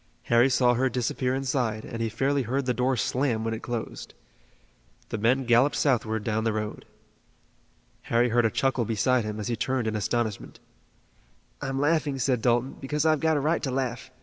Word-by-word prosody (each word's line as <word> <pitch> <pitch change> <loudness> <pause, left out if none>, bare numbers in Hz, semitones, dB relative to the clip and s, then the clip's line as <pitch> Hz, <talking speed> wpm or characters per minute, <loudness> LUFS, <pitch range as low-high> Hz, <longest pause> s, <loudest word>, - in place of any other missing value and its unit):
Harry 120 +3 +4
saw 125 -1 +3
her 130 +2 +1
disappear 125 +1 -1
inside, 125 -5 -1
and 115 - -6
he 115 - 0
fairly 135 +5 0
heard 130 +3 -2
the 125 - +1
door 125 +2 0
slam 120 0 0
when 115 0 -2
it 110 - -5
closed. 120 -2 -6 0.9
The 110 - -3
men 125 +5 +2
galloped 120 +4 +4
southward 110 -5 +1
down 110 0 -1
the 115 -1 0
road. 105 0 -4 1.2
Harry 120 +1 +3
heard 120 0 +3
a - - -1
chuckle 135 +1 0
beside 115 +3 +1
him 105 0 -4
and 105 - -4
he 120 - -1
turned 130 +1 -1
in 110 - -1
astonishment. 110 0 -2 1.0
"I'm 135 0 -3
laughing," 145 -1 +1
said 125 -2 0
Dalton, 120 +2 +1
"because 150 +3 -1
I've 155 -2 +3
got 160 0 +2
a - - +1
right 155 +4 +1
to 140 - -2
laugh. 130 -1 -3
125 Hz, 185 wpm, -26 LUFS, 115-135 Hz, 1.2 s, Harry